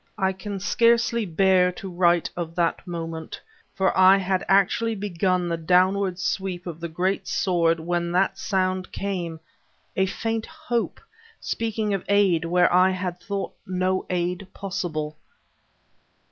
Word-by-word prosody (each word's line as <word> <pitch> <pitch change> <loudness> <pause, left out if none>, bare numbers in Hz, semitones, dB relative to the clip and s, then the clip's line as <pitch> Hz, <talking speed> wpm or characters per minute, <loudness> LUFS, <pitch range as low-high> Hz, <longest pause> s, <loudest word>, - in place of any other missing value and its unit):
I 190 -2 +1
can 195 +1 -6
scarcely 235 +1 +2
bear 180 +1 +3
to 195 - -8
write 175 -2 +2
of 170 -1 -5
that 170 +1 0
moment, 165 -2 -5 0.4
for 190 -1 +1
I 190 +1 +7
had 190 -1 0
actually 200 +4 +3
begun 185 -2 0
the 170 -1 -1
downward 185 +3 +2
sweep 185 -1 -2
of 170 -3 -6
the 170 - -4
great 180 +4 -1
sword 165 -3 +1
when 170 +1 -1
that 185 +2 +1
sound 185 -2 -1
came 175 -5 -4 0.6
a 190 0 +2
faint 225 +3 -3
Hope, 315 -8 -3 0.4
speaking 220 -2 -2
of 195 - -2
aid 195 -5 +3
where 175 +1 +3
I 185 +1 +6
had 185 -1 -3
thought 200 +1 -4
no 185 0 0
aid 180 +1 -2
possible. 160 -6 -4
185 Hz, 140 wpm, -24 LUFS, 175-195 Hz, 0.6 s, I